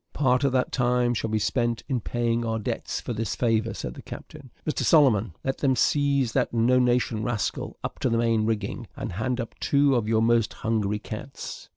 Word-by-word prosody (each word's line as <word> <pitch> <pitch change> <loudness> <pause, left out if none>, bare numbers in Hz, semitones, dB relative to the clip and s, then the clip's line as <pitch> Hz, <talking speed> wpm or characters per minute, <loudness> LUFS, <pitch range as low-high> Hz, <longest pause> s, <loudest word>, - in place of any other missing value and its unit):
"Part 130 -2 +2
of 140 - +3
that 130 -1 +1
time 125 -1 +2
shall 115 -1 -2
be 110 - +1
spent 120 +1 0
in 130 -4 0
paying 120 0 -1
our 115 -1 -1
debts 105 - -3
for 120 - -4
this 110 -2 -2
favour," 115 -1 +1
said - - -5
the - - -10
captain. 145 -4 -10 0.2
"Mr 155 - -1
Solomon, 115 - +4
let 135 0 -2
them 135 -2 +2
seize 140 0 +2
that - - +1
no 120 +2 +3
nation 120 -3 +1
rascal 110 -2 -2
up - - -5
to 130 - +1
the 115 - +1
main 115 -2 +2
rigging, 110 -3 -2
and - - -4
hand 120 +7 -2
up 115 - -4
two 140 -1 +3
of 120 -4 +1
your 110 0 +2
most 115 -1 +2
hungry 105 -2 +1
cats. 110 +5 -8
120 Hz, 205 wpm, -26 LUFS, 110-130 Hz, 0.2 s, Solomon